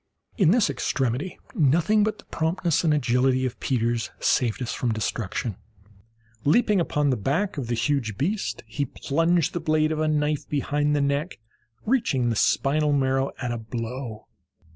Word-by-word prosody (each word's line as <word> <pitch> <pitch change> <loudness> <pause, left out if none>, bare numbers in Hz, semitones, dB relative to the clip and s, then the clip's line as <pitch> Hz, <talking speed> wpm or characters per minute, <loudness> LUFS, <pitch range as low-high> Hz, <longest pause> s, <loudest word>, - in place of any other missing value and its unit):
In 190 -8 +4
this 220 +3 +4
extremity 135 +2 -2 0.2
nothing 170 +8 +3
but 215 0 -1
the - - -16
promptness 165 0 0
and 160 - +3
agility 130 -2 +2
of 125 -1 -4
Peters 120 -2 0
saved 120 -4 +1
us 120 - -3
from 120 - -1
destruction. 110 -1 -3 0.9
Leaping 210 - +3
upon 150 -4 +1
the - - +2
back 150 - -1
of 135 -6 -4
the 120 - -1
huge 115 -4 -1
beast, 190 - -2
he 110 +5 -3
plunged 165 +4 0
the 175 - -1
blade 155 -1 +1
of 155 - -2
a 155 - +1
knife 150 -1 0
behind 145 +1 0
the 145 - +1
neck, 140 +5 -1 0.5
reaching 210 - +1
the - - -1
spinal 150 +7 +2
marrow 135 -1 +1
at 125 -2 -2
a 120 - -3
blow. 115 0 -6
145 Hz, 165 wpm, -25 LUFS, 125-160 Hz, 0.9 s, In